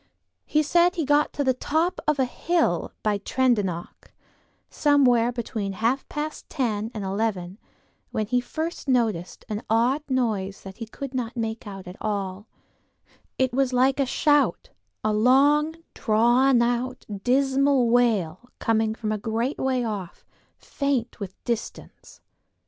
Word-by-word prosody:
He 305 0 +2
said 345 +4 +3
he 335 - -1
had - - -5
got 290 +1 +3
to 285 - -1
the 260 -1 +3
top 320 +7 0
of 300 -1 +3
the 265 - +2
hill 305 - 0
by 210 -1 +1
Tredonoc, 205 -8 -1 0.6
somewhere 250 -5 +3
between 220 -4 -4
half 230 +7 -1
past 300 +1 -5
ten 220 -6 -1
and 210 - -4
eleven, 195 -1 -2 0.5
when 215 - -2
he 245 +3 +1
first 320 +6 -5
noticed 225 -9 0
an 210 0 -3
odd 240 +6 +2
noise 215 -7 -1
that 190 0 -10
he 230 - -6
could 275 +3 -7
not 250 -2 -3
make 225 -1 -3
out 195 -2 -8
at 180 - -9
all; 200 -1 -3 0.9
it 260 -1 +1
was 265 0 +1
like 260 +2 +3
a 275 - +2
shout, 295 - +2 0.3
a 215 0 +1
long, 285 +8 +4 0.2
drawn 240 +2 +3
out, 245 +2 -2 0.2
dismal 270 0 +3
wail 230 -3 +1
coming 220 -1 +1
from 215 -1 -3
a 215 - -1
great 230 +6 -2
way 260 -2 0
off, 205 -6 -5 0.3
faint 275 -5 -2
with 195 -2 -6
distance. 235 -2 -6
240 Hz, 145 wpm, -25 LUFS, 215-270 Hz, 0.9 s, long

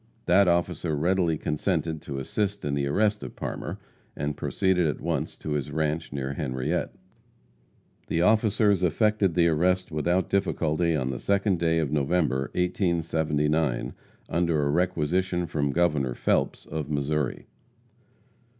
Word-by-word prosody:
That 95 +2 +5
officer 85 -2 +1
readily 85 0 +1
consented 80 0 -1
to 70 -3 -6
assist 100 +9 -2
in 70 - -1
the 70 -1 0
arrest 105 +7 +1
of - - -8
Parmer, - - -5 0.4
and 75 0 -2
proceeded 90 +2 +1
at 75 - -2
once 80 -3 -2
to 75 - -6
his 75 -3 -1
ranche, 80 +1 -2
near 70 -1 -3
Henriette. 70 +2 -2 1.1
The 85 - +1
officers 105 -2 +3
effected 100 +1 +2
the 85 -1 +4
arrest 90 +3 +1
without 85 +4 +1
difficulty 85 -4 +1
on 65 -3 -1
the 65 - -4
2d 100 - +1
day 80 0 +2
of 80 -4 0
November, 70 -2 +1
1879, 80 - 0 0.3
under 85 -2 +1
a 70 - +1
requisition 90 +1 0
from 75 -3 -1
Governor 75 -7 +1
Phelps, - - 0
of 75 -2 -5
Missouri. 75 -1 -1
80 Hz, 135 wpm, -26 LUFS, 75-90 Hz, 1.1 s, That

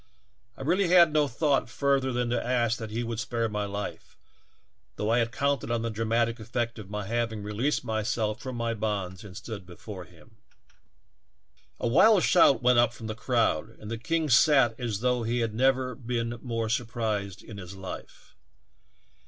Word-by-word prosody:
I - - -6
really 180 +6 +2
had 170 -3 +6
no 150 -1 +3
60 120 - -14
THE - - -24
TALKING 150 - +4
HANDKERCHIEF. 135 -2 +2
thought - - -16
further 140 -2 +2
than 125 -1 -1
to 120 - 0
ask 120 -2 +1
that 110 - -5
he 115 +3 -2
would 115 -1 -4
spare 115 +1 -1
my 105 -1 -2
life, 100 0 -6 0.8
though 105 +1 -1
I 120 - +4
had 115 0 0
counted 140 -2 0
on 115 -1 0
the 115 - -2
dramatic 115 +2 0
effect 120 +1 -3
of 100 -3 -9
my 105 -1 -4
having 110 -1 -2
released 110 +10 -1
myself 110 -1 -1
from 130 -2 -5
my 115 -1 -1
bonds 100 -4 -3
and 95 -2 -10
stood. 110 -2 -7
before 95 +1 -9
him. 90 +6 -20 1.4
"A - - -1
wild 185 - +5
shout 165 -7 +5
went 125 -1 +5
up 120 0 +3
from 120 - -9
the 110 - -3
crowd, 115 -4 0
and 105 - -9
the 115 - -3
king 165 +5 0
sat 135 -2 +5
as 115 -5 -3
though 125 -1 +1
he 120 +1 -1
had 115 -2 -1
never 130 +2 +2
been 120 -1 -3
more 115 -3 -2
sur 115 +2 0
prised 105 -4 -3
in 105 -3 -9
his 95 0 -9
life. 95 -1 -9
115 Hz, 195 wpm, -28 LUFS, 110-125 Hz, 1.4 s, had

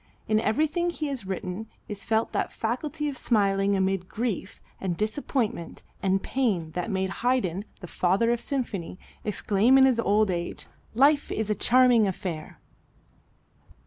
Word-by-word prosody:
In 215 0 +3
everything 310 +10 +1
he 310 -3 -3
has 255 -8 -4
written 190 +3 -4 0.2
is 205 -1 -6
felt 225 0 0
that - - -1
faculty 295 +7 -2
of 285 - -3
smiling 200 -4 +2
amid 190 -1 0
grief 220 -4 -3 0.2
and 180 -3 -2
disappointment 220 - -2 0.2
and 195 0 +1
pain 200 -12 0
that 180 +6 -3
made 190 -1 -1
Haydn, 215 -7 0 0.2
the - - -6
Father 190 +8 +2
of 240 - 0
the - - -8
Symphony, 215 - -3 0.3
exclaim 210 +4 +3
in 265 - +7
his 255 -3 +3
old 210 -2 +3
age, 170 -1 -4 0.3
"Life 285 +4 +4
is 215 -1 -1
a - - +4
charming 245 -3 +5
affair." 180 -4 -5
215 Hz, 150 wpm, -26 LUFS, 190-255 Hz, 0.3 s, in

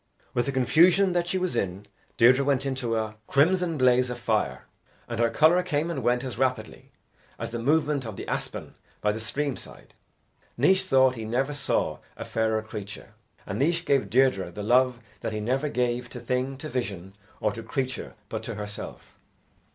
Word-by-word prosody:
With 120 - 0
the - - +1
confusion 170 +8 +4
that 175 -1 0
she 185 - 0
was 185 -1 -1
in, 95 +1 -2 0.3
Deirdre 125 +3 +6
went 135 -1 +1
into 130 -4 -1
a 110 -1 -3
crimson 170 +3 +2
blaze 125 -1 +4
of 125 - -4
fire, 115 -3 -1 0.4
and 115 -1 -4
her 115 0 +3
colour 160 +9 +4
came 170 -2 -1
and - - -3
went 125 +1 +1
as 130 -2 -5
rapidly 130 -5 -2 0.5
as - - -5
the 120 - -3
movement 145 +2 +2
of 110 -4 -6
the - - -7
aspen - - -4 0.3
by 105 - +2
the 110 - -4
stream 140 +4 -2
side. - - -12 0.6
Naois 190 +9 +4
thought 130 -6 +4
he 115 -3 -6
never 130 +6 -1
saw 145 - -1 0.2
a - - -6
fairer 110 -1 0
creature, 105 0 -8 0.3
and 100 - -4
Naois 165 +4 +2
gave 140 -2 +2
Deirdre 125 -8 +3
the 100 +4 -7
love 125 +2 +3 0.2
that - - -4
he 105 - -2
never 130 +7 0
gave 125 -1 -1
to 125 - -8
thing, 125 +3 -2
to 155 - -7
vision, 100 - -4 0.2
or 105 - +1
to 115 - -7
creature 130 +3 -4
but 110 +1 -4
to 115 0 -5
herself. 105 0 -7
125 Hz, 185 wpm, -26 LUFS, 110-140 Hz, 0.6 s, Deirdre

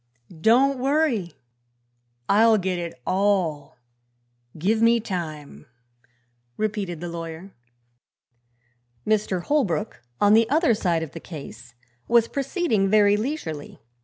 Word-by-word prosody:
"Don't 255 +6 +4
worry; 265 - 0 0.9
I'll 220 +2 +5
get 185 -2 -2
it 170 -7 -6
all; 185 -7 0 0.8
give 210 +8 +1
me 230 +1 +4
time," 155 - -6 0.9
repeated 200 -6 -3
the 175 - -4
lawyer. 170 +2 -7 1.5
Mr. 205 -4 0
Holbrook, 215 - -1 0.2
on 205 0 +4
the 225 +1 +4
other 310 -2 +3
side 175 -6 0
of 160 - -7
the 165 - -8
case, 120 -8 -11 0.3
was 235 -1 +4
proceeding 275 - 0
very 205 0 +4
leisurely. 210 - -5
200 Hz, 105 wpm, -24 LUFS, 170-230 Hz, 1.5 s, I'll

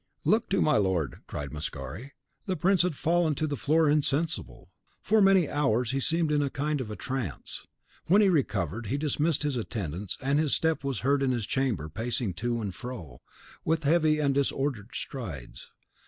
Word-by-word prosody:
"Look 225 +2 +2
to 195 - +2
my 150 -2 +3
lord," 90 - 0
cried 70 -2 -5
Mascari. 75 - -6 0.3
The 185 - 0
prince 185 +4 +3
had 175 -3 0
fallen 165 0 +2
to 155 - -1
the 145 -2 -2
floor 155 +4 +2
insensible. 150 +3 0 0.3
For 220 -1 +3
many 195 -4 +5
hours 125 -5 +1
he 135 - 0
seemed 160 +2 +1
in 150 -1 +3
a 140 - 0
kind 145 +1 -1
of 110 -4 -5
trance. 130 - -5 0.4
When 195 +5 +6
he 210 - +5
recovered, 110 - 0
he 135 - -1
dismissed 150 +1 +1
his 145 -4 0
attendants, 100 -5 -4
and 140 +2 +1
his 155 -3 +2
step 160 -2 0
was 135 -4 -2
heard 140 +2 +2
in 135 - +2
his 120 -4 0
chamber, 115 - -1
pacing 110 - -2
to 120 0 0
and 100 -4 -3
fro, 90 - -8 0.4
with 160 0 0
heavy 155 0 +3
and 145 -2 +2
disordered 135 -5 -1
strides. 85 - -6
135 Hz, 180 wpm, -28 LUFS, 110-155 Hz, 0.4 s, When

